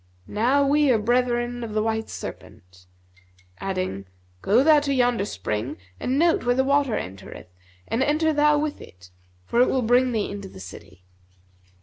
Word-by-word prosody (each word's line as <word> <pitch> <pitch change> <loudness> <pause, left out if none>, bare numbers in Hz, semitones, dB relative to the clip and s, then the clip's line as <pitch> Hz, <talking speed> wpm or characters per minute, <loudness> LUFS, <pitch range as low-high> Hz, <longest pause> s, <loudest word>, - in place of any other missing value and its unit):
Now 255 - +1
we 290 +1 +3
are 245 - +4
brethren 240 +1 0
of 220 -2 -6
the 215 - +1
white 220 0 -2
serpent,' 90 0 -10 0.7
adding, 185 - -4 0.3
'Go 230 +6 +3
thou 310 0 +6
to 285 -1 -2
yonder 245 -5 +2
spring 110 - -4 0.2
and 260 +2 -1
note 335 +2 +3
where 245 0 +1
the 265 - +2
water 280 -3 +1
entereth, 95 -1 -9 0.3
and 230 - -1
enter 310 +3 +2
thou 295 0 +3
with 295 0 -3
it; 90 0 -15 0.3
for 235 - +1
it 250 - +4
will 260 -2 0
bring 245 +2 +3
thee 215 -4 -2
into 200 -1 -7
the 140 - -13
city.' 95 0 -12
240 Hz, 165 wpm, -24 LUFS, 195-275 Hz, 0.7 s, thou